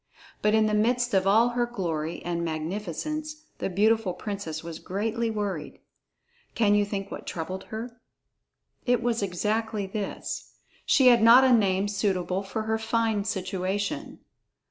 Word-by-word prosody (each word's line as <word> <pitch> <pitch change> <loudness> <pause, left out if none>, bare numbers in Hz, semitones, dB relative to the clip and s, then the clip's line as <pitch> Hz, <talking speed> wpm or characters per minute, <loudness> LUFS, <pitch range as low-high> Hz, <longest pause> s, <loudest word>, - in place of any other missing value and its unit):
But 210 +1 +3
in 220 0 +4
the 215 - 0
midst 240 +3 +2
of 190 0 +3
all 225 +4 +5
her 240 0 0
glory 165 -8 -3
and 170 -1 -1
magnificence, 205 - -3 0.2
the - - -1
beautiful 210 0 +2
princess 195 -7 -5
was 165 -1 -7
greatly 225 +4 -2
worried. 205 -7 -3 0.8
Can 210 -3 +3
you 205 0 +3
think 200 -1 -5
what - - -7
troubled 185 +3 -5
her? 235 +2 -7 0.9
It 245 -1 +2
was 235 -2 0
exactly 210 +3 -1
this. 200 +1 -5 0.3
She 260 -2 +6
had 240 -2 +5
not 235 +3 +8
a 260 -1 +5
name 200 -3 +3
suitable 190 -2 -1
for 200 +2 -4
her 220 0 -1
fine 220 -2 0
situation. 190 -1 -3
210 Hz, 145 wpm, -27 LUFS, 190-225 Hz, 0.9 s, not